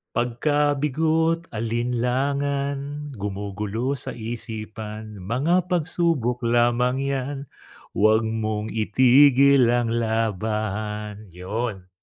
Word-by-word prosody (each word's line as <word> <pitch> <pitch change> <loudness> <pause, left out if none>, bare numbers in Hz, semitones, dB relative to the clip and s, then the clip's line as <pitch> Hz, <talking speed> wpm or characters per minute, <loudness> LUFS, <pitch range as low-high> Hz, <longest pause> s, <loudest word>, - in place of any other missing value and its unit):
Pagkabigo't 150 +6 +1
alinlangan 140 +5 -1
gumugulo 105 +6 -3
sa 130 0 -5
isipan 110 -2 -6
mga 150 - +1
pagsubok 165 -8 0
lamang 120 +2 +2
'yan 140 0 -2 0.5
huwag 110 +2 +3
mong 110 -1 -2
itigil 130 +3 +5
ang 120 -1 +1
laban, 110 -2 -2
'yon. 95 0 -4
120 Hz, 75 wpm, -24 LUFS, 110-140 Hz, 0.5 s, itigil